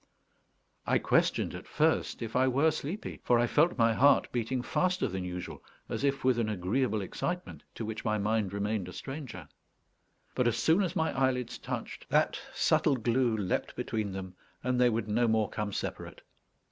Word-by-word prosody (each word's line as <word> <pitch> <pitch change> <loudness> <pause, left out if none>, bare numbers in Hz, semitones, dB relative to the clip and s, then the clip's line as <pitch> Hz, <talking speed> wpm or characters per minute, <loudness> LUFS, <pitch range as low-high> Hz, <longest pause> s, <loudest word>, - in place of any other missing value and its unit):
I - - +4
questioned - - +1
at - - -8
first - - +1
if 110 -1 -6
I 130 +1 +4
were 140 +5 +3
sleepy, 155 +6 -5
for 120 - +4
I 120 - +3
felt 150 +8 +2
my 115 -1 +4
heart 140 +5 +4
beating 120 +1 -1
faster 185 +6 +1
than 95 0 -4
usual, 90 0 -6 0.3
as - - -3
if 140 -1 +1
with 130 -2 +3
an 110 -2 0
agreeable 105 +3 0
excitement 180 - -4
to 115 - -4
which 110 0 -5
my 110 -1 +1
mind 105 -1 0
remained 100 -2 -2
a - - -9
stranger. 130 - -7 0.9
But 125 -2 +1
as 120 -1 +1
soon 160 - +3
as 180 -3 -1
my 160 0 0
eyelids 130 -2 0
touched, - - -6
that - - +2
subtle 145 - +2
glue 120 -1 +1
leaped 95 -3 -2
between 110 -3 -2
them, 95 -1 -6 0.3
and 125 0 +1
they 125 - +6
would 115 -2 -1
no 115 +3 +2
more 110 -1 +1
come 105 -1 -3
separate. - - -5
120 Hz, 180 wpm, -30 LUFS, 105-130 Hz, 0.9 s, they